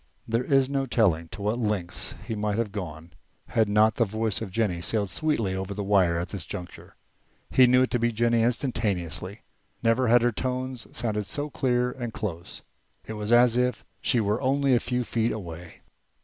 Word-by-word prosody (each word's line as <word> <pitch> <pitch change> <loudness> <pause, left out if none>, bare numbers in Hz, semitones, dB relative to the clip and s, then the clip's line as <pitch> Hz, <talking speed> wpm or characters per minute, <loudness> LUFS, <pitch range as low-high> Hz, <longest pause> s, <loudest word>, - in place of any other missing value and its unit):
There 115 +2 0
is 135 0 +3
no 135 -1 -1
telling 90 -9 +2
to 95 +5 -8
what 105 +4 0
lengths 105 -6 -2
he 115 - -3
might 105 -1 -1
have 115 -3 -1
gone 85 -5 -7 0.4
had 110 -3 +2
not 105 +1 +4
the 120 - +4
voice 110 -2 -1
of 110 - -4
Jennie 95 -4 -1
sailed 100 +1 0
sweetly 130 -12 0
over 95 +1 -4
the 100 - -3
wire 95 -4 +3
at 85 +1 -3
this 95 -4 -5
juncture. 90 0 -9 0.6
He 130 -1 +6
knew 125 +1 +5
it 130 - -1
to 120 - +1
be 120 +1 +1
Jennie 115 +1 +2
instantaneously; 105 - -1 0.4
never 115 +3 +3
had 120 +1 +5
her 120 - +3
tones 130 +1 -3
sounded 105 -3 -2
so 145 0 -2
clear 125 -3 +1
and 120 -2 -5
close. 85 -6 -6 0.4
It 110 - -6
was 105 +1 -4
as 120 0 +5
if 125 0 0 0.2
she 125 - +2
were 105 +1 0
only 135 0 +2
a 120 - +5
few 125 +1 -1
feet 115 0 0
away. 85 -5 -8
110 Hz, 190 wpm, -26 LUFS, 100-125 Hz, 0.6 s, He